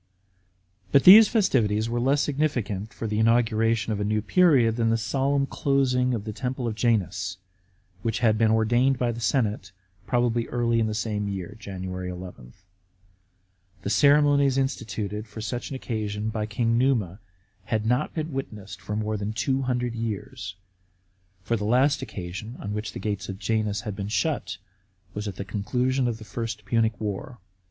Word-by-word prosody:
But 140 - +5
these 210 +4 +10
festivities 115 - +2
were 120 +1 -1
less 135 +4 +2
significant 120 -9 -1
for 105 +2 -6
the 105 0 -1
inauguration 115 -1 +2
of 105 - -3
a - - 0
new 105 +1 +1
period 135 -9 +4
than 115 -1 +2
the 115 - +2
solemn 140 +4 0
closing 130 -3 +1
of 105 - -4
the 110 0 -5
temple 125 +2 -3
of 115 - -1
Janus, 100 -5 0 0.6
which 115 0 -1
had 110 -1 +3
been 110 0 +3
ordained 120 +4 +3
by 120 -1 0
the 115 - -6
senate, 110 -4 0 0.4
probably 120 -2 +1
early 120 -1 +1
in 110 - +1
the 110 - -3
same 105 -2 -2
year 100 +1 -5
(Jan. 95 -2 -7
11). 90 -7 -7 1.3
The - - -2
ceremonies 140 +3 +4
instituted 110 -5 -2
for 110 - -10
such 120 +3 -4
an 140 - -5
occasion 110 -4 -3
by 110 -1 -3
King 115 +2 +1
Numa 110 -8 +1 0.5
had 110 -1 -1
not 125 +6 0
been 155 -1 -3
witnessed 105 -7 -6
for 105 - -4
more 110 0 -1
than 105 +1 -3
two 135 +3 0
hundred 125 -2 -1
years, 105 -4 -5 0.9
for 115 - 0
the 105 - -3
last 130 +7 +3
occasion 100 +6 -6
on 105 - -5
which 105 +1 -4
the - - -6
gates 105 -2 -3
of 95 - -5
Janus 110 -1 -1
had 105 -2 -5
been 100 -1 -4
shut 135 0 -1 0.6
was 105 +1 -4
at 100 - -5
the 100 - -6
conclusion 125 +6 0
of 115 -2 -2
the 110 - -11
First 110 -3 -5
Punic 110 0 +1
War. 105 +4 -4
110 Hz, 170 wpm, -25 LUFS, 105-125 Hz, 1.3 s, these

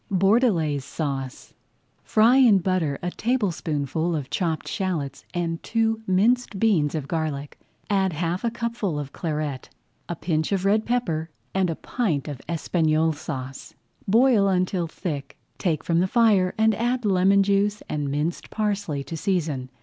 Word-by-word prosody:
BORDELAISE 190 - +2
SAUCE 135 -3 -5 0.5
Fry 230 +4 +4
in 240 -7 +6
butter 175 -6 0
a 180 - -1
tablespoonful 170 - -1
of 145 -4 -5
chopped 165 -5 -1
shallots 155 -8 -3
and 170 -2 -2
two 225 -1 0
minced 220 +4 +2
beans 170 -10 +2
of 145 -3 -3
garlic. 150 -3 -3 0.3
Add 195 -2 +2
[Page 160 - -7
18] - - -5
half 175 +2 -1
a 235 - +2
cupful 230 -7 -3
of 145 -2 -5
Claret, 150 -5 -3 0.4
a 175 - -2
pinch 160 0 -1
of 195 -1 0
red 215 +2 +2
pepper, 170 -10 -1 0.2
and 190 -2 +1
a 165 - -2
pint 165 - -2
of 145 -4 -6
Espagnole 160 -1 +1
Sauce. 135 -3 -7 0.3
Boil 225 -1 +4
until 185 -2 +1
thick, 145 -4 -5 0.2
take 160 -5 0
from 170 -1 +1
the 185 - +2
fire 205 -4 +3
and 220 0 +4
add 240 +3 -1
lemon 195 0 +4
juice 200 +1 +1
and 145 -2 -2
minced 150 +4 -2
parsley 200 -9 -2
to 140 +5 -6
season. 155 -8 -1
180 Hz, 155 wpm, -24 LUFS, 155-205 Hz, 0.5 s, in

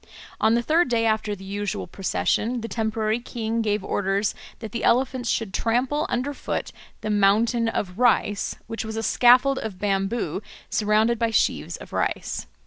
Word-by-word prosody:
On 220 +1 +4
the 235 - +1
third 320 +2 +3
day, 230 -1 +2
after 215 -1 0
the 195 - -12
usual 200 +1 -3
procession, 215 +6 -1
the 230 - -4
temporary 220 -1 -1
king 230 -2 -3
gave 210 -2 0
orders 200 +1 0 0.2
that 220 -3 -8
the 235 - -4
elephants 255 -1 +2
should 215 -4 -1
trample 255 +6 0
under 260 +4 -1
foot - - -4 0.3
the 215 - -2
"mountain 220 +3 +3
of 190 -2 -3
rice," 225 -4 +2
which 225 - -4
was 220 0 -5
a 225 - -2
scaffold 255 +4 +5
of 210 -4 -5
bamboo 195 -1 -1 0.3
surrounded 220 +2 +2
by 230 -1 +2
sheaves 225 - 0
of - - -12
rice. - - -2
225 Hz, 165 wpm, -24 LUFS, 205-240 Hz, 0.3 s, scaffold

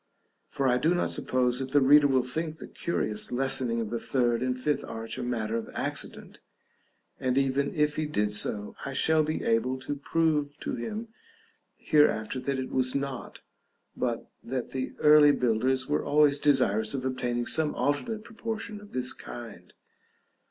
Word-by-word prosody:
For 135 - -1
I 125 0 +3
do 165 +7 +2
not 175 - +1
suppose 125 -1 +1
that 135 0 -5
the 145 - +6
reader 145 +2 +6
will 130 -2 +2
think 155 +5 -2
the - - -8
curious 110 -10 -1
lessening 125 -2 0
of 110 -2 -3
the 120 - -2
third 120 -2 0
and 130 0 -1
fifth 145 +3 -1
arch 115 0 -6
a - - -3
matter 115 -3 -2
of 115 - -5
accident, - - -4 0.8
and 130 0 0
even 135 +1 +1
if 150 -1 +1
he 155 -1 -1
did 105 -8 0
so, 105 0 -1
I 135 - -4
shall 160 +3 +3
be 155 +1 -2
able 115 +3 +1
to 140 - -3
prove 150 0 0
to - - -3
him 215 - -5 0.7
hereafter 130 -6 +2
that 135 +1 -2
it 130 0 -4
was 130 0 +1
not, 140 -2 -4 0.5
but - - -2 0.2
that 130 0 -4
the 130 -1 -4
early 150 -1 +7
builders 130 +2 +1
were 150 - 0
always 145 -1 +3
desirous 110 -5 +2
of 130 -1 -4
obtaining 125 -2 -1
some 155 +2 +2
alternate 210 +10 -1
proportion 220 -1 -6
of 205 - -15
this 125 0 0
kind. 115 -7 -10
130 Hz, 170 wpm, -28 LUFS, 120-150 Hz, 0.8 s, early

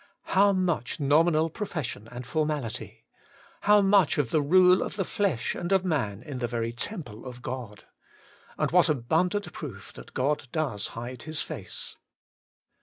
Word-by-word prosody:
How 200 +1 +6
much 180 -10 0
nominal 155 +3 +4
profession 155 - -4
and 125 0 -7
formality! 145 -4 -3 0.6
how 210 0 +8
much 195 -4 +4
of 140 -6 0
the 155 - +3
rule 180 +5 +6
of - - -3
the 195 -3 -1
flesh 170 - 0
and 175 +2 -4
of 190 -1 +3
man 120 - -1
in 135 -2 -6
the 120 - -1
very 115 -1 -2
temple 120 - -6
of 125 -1 -9
God! 120 -5 -6 0.7
And - - 0
what 175 -1 +5
abundant 165 - 0
proof 110 - -8
that - - -13
God 140 +1 0
does 135 -11 -1
hide 120 +1 -6
His 155 +2 -3
face - - -6
150 Hz, 155 wpm, -27 LUFS, 120-180 Hz, 0.7 s, how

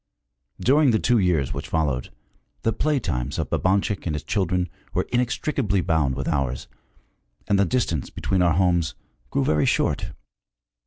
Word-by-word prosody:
During 145 +2 +4
the 110 - +4
two 120 -1 +3
years 85 -8 +1
which - - -5
followed, 70 -6 -1 0.5
the 115 - +1
play 150 -2 +1
times 65 - -3
of - - -3
Babanchik 95 0 +1
and 75 - -1
his 75 - -4
children 90 -3 0 0.3
were - - 0
inextricably 120 -4 0
bound 75 -6 +1
with - - -4
ours, 65 -3 -1 0.8
and 100 - +3
the 100 - +4
distance 85 - -1
between 95 -2 -1
our 85 -2 +4
homes 85 -3 +2 0.3
grew 135 -1 0
very 75 - +2
short. - - +1
90 Hz, 155 wpm, -24 LUFS, 75-115 Hz, 0.8 s, During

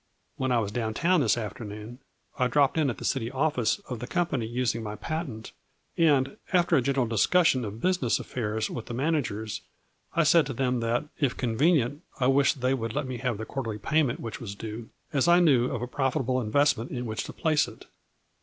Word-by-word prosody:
When 130 -1 -1
I 125 - +3
was 105 -3 -1
down 110 -1 -2
town 175 +3 +3
this 120 -2 +2
afternoon 110 +1 -6 0.4
I 125 - +3
dropped 140 +2 +3
in 155 -4 +2
at 120 - -4
the - - -7
city 120 -4 0
office 130 -3 +1
of 125 -3 -5
the 125 - -6
company 140 -10 -1
using 120 0 -1
my 105 -1 -5
patent, 140 -6 -5 0.4
and, 145 -6 +3
after 175 -2 +3
a 135 - +4
general 135 0 +1
discussion 130 - +3
of 110 +1 -6
business 180 -10 +1
affairs 110 -2 -2
with 120 - -6
the 120 - -5
managers, 125 -7 -1 0.5
I 165 - +4
said 155 -1 +5
to 135 - -3
them 125 0 0
that, 115 +4 0
if 140 -4 +1
convenient, 140 +3 +2 0.2
I 125 - +2
wished 140 0 +3
they 130 +1 +2
would 115 -4 -3
let 150 -1 -1
me 130 -1 -4
have 120 -2 -2
the 110 - -5
quarterly 115 -6 -4
payment 140 +4 +1
which 115 - -6
was 100 -4 -6
due, 110 +2 -7 0.2
as 140 +2 +2
I 175 +1 +6
knew 140 -9 +4
of 120 -2 -3
a - - -3
profitable 130 -1 0
investment 120 +1 +2
in 125 -1 -4
which 110 -1 -3
to - - -8
place 155 -3 +2
it. - - -12
125 Hz, 205 wpm, -27 LUFS, 115-145 Hz, 0.5 s, I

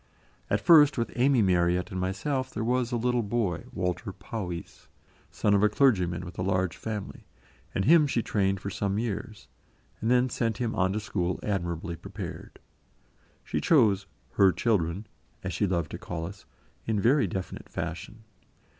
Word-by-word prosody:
At - - +2
first, 150 -5 +7
with 115 - -1
Amy 125 -1 +4
Marryat 90 +1 +2
and 95 - -3
myself, 130 +9 -1
there - - -4
was 125 +1 0
a - - 0
little 125 +1 +1
boy, 105 -6 -1
Walter 90 -2 -2
Powys, 90 -7 -7 0.4
son 105 - +1
of 100 - +4
a 105 - +5
clergyman 90 - +2
with 85 - -9
a - - 0
large 95 -2 0
family, 105 -3 -6 0.5
and 95 - +1
him 155 0 +6
she 120 -4 0
trained 95 -2 0
for 100 +2 -5
some 100 +1 -1
years, 105 -2 -4 0.5
and 110 - 0
then 125 +1 +4
sent 115 -3 -1
him 120 -3 -1
on 95 0 +1
to 105 - -1
school 90 -4 -2
admirably 85 -4 -2
prepared. 95 +1 -8 0.9
She - - -2
chose 105 - +4 0.2
"her 95 +7 +5
children" 95 -1 0 0.4
as - - -3
she 100 - +1
loved 85 -5 -1
to - - -6
call 80 -2 -5
us 95 +3 -10 0.4
in 110 -2 +1
very 125 +3 +3
definite 95 +1 -6
fashion. 110 +1 -6
100 Hz, 165 wpm, -28 LUFS, 90-120 Hz, 0.9 s, first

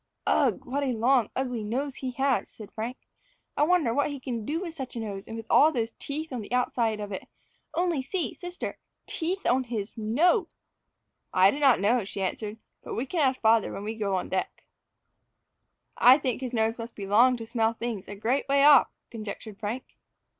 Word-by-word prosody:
"Ugh! - - +2
what 275 +3 -2
a 270 -3 0
long 240 0 +3
ugly 250 -4 -2
nose 260 +6 -3
he 260 - -3
has," 270 0 +1
said 215 -3 -11
Frank. 230 +4 -5 0.6
"I - - 0
wonder 305 -6 +3
what 285 +3 +1
he 285 -1 -5
can 240 -3 -4
do 315 +3 -1
with 345 -3 -5
such 265 -6 -7
a - - -3
nose, 200 -3 -6
and 225 - -6
with 225 - -7
all 310 - +6
those 230 -5 -2
teeth 305 +1 -5
on 245 - -3
the 205 - -10
outside 235 -3 +1
of 205 -1 -5
it 190 - -6 0.5
only 345 -5 +1
see, 335 +6 -2
sister, 355 0 -6 0.3
teeth 370 +4 -3
on 255 +1 +2
his 220 -3 -4
NOSE!" 325 - +2 0.9
"I 190 +2 +6
do 285 - -4
not 270 -7 +5
know," 220 +4 +2
she 195 0 -5
answered, 210 +3 -3 0.2
"but - - -6
we 240 - -1
can 335 +6 -3
ask 265 -2 +2
father 225 -1 +4
when 200 - -6
we 215 +1 -3
go 205 -3 -1
on 185 - -2
deck." 190 - -3 1.3
"I 255 +2 +7
think 260 -4 -2
his 255 -2 -3
nose 225 0 0
must 230 +1 -7
be 200 - -6
long 240 +6 +5
to 225 - -7
smell 225 -1 +1
things 230 -4 -5
a 205 - -7
great 235 +7 0
way 280 0 +4
off," 290 0 +8 0.2
conjectured 215 -1 -7
Frank. 225 +4 -3
240 Hz, 205 wpm, -27 LUFS, 220-275 Hz, 1.3 s, off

